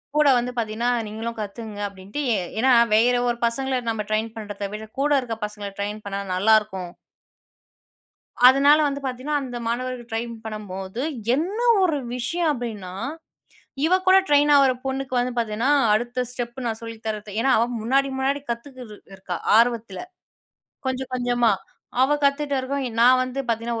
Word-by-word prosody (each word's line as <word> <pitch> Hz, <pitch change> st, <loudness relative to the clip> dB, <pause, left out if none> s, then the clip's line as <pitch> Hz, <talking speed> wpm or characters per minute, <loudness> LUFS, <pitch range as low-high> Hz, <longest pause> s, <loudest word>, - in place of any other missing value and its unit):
கூட 300 Hz, -1 st, +4 dB
வந்து 245 Hz, +1 st, -1 dB
பார்த்தீங்கன்னா, 230 Hz, +1 st, -1 dB, 0.2 s
நீங்களும் 225 Hz, +2 st, -5 dB
கத்துக்கங்க 210 Hz, 0 st, -6 dB
அப்டின்ட்டு, 200 Hz, +7 st, -7 dB
எ -, -, +1 dB, 0.2 s
ஏன்னா 260 Hz, +3 st, +4 dB, 0.2 s
வேற 240 Hz, +3 st, +4 dB
ஒரு 240 Hz, -, -1 dB
பசங்கள 260 Hz, +2 st, 0 dB
நம்ம 220 Hz, -2 st, -2 dB
ட்ரெயின் 220 Hz, +1 st, 0 dB
பண்ணுறத 205 Hz, -2 st, -5 dB
விட, 215 Hz, +1 st, -6 dB
கூட 290 Hz, +2 st, +1 dB
இருக்குற 230 Hz, -4 st, -5 dB
பசங்கள 210 Hz, -1 st, -7 dB
ட்ரெயின் 210 Hz, +1 st, -4 dB
பண்ணா 200 Hz, 0 st, -3 dB
நல்லாருக்கும். 200 Hz, -2 st, +2 dB, 1.6 s
அதுனால 280 Hz, +3 st, +6 dB
வந்து 280 Hz, 0 st, -3 dB
பார்த்தீங்கன்னா, 265 Hz, +3 st, -2 dB
அந்த 250 Hz, -3 st, -5 dB
மாணவர்கள் 245 Hz, 0 st, -3 dB
ட்ரைன் 230 Hz, +1 st, -3 dB
பண்ணும்போது, 205 Hz, 0 st, -6 dB, 0.3 s
என்ன 365 Hz, -, -2 dB, 0.2 s
ஒரு 325 Hz, -5 st, +2 dB, 0.2 s
விஷயம்? 320 Hz, +8 st, -1 dB
அப்டின்னா, 215 Hz, -8 st, -6 dB, 0.9 s
இவ 340 Hz, -, +2 dB
கூட 375 Hz, +1 st, +8 dB
ட்ரெயின் 290 Hz, 0 st, +4 dB
ஆவற 275 Hz, -2 st, +6 dB
பொண்ணுக்கு 265 Hz, 0 st, -3 dB
வந்து 245 Hz, 0 st, -1 dB
பார்த்தீங்கன்னா, 230 Hz, +3 st, 0 dB, 0.2 s
அடுத்த 240 Hz, +3 st, -1 dB
ஸ்டெப் 240 Hz, -1 st, -5 dB
நான் 225 Hz, -1 st, -3 dB
சொல்லி 230 Hz, 0 st, -7 dB
தரது, 215 Hz, -1 st, -4 dB
ஏன்னா 265 Hz, +3 st, +2 dB
அவ 225 Hz, -, +4 dB, 0.2 s
முன்னாடி 270 Hz, +5 st, +2 dB
முன்னாடி 275 Hz, +2 st, 0 dB
கத்துக்கிட்டு 240 Hz, -2 st, -8 dB, 0.2 s
இருக்கா, 185 Hz, -2 st, -5 dB, 0.2 s
ஆர்வத்துல, 230 Hz, -4 st, +1 dB, 0.9 s
கொஞ்சம் 260 Hz, 0 st, -3 dB
கொஞ்சமா, 245 Hz, -2 st, +2 dB, 0.5 s
அவ 275 Hz, +3 st, +4 dB
கத்துட்ட 280 Hz, 0 st, +1 dB
இருக்கும் 270 Hz, +1 st, -2 dB, 0.2 s
நான் 255 Hz, +1 st, +6 dB
வந்து 255 Hz, +1 st, -5 dB
பார்த்தீங்கன்னா, 230 Hz, 0 st, -1 dB
235 Hz, 150 wpm, -23 LUFS, 215-265 Hz, 1.6 s, கூட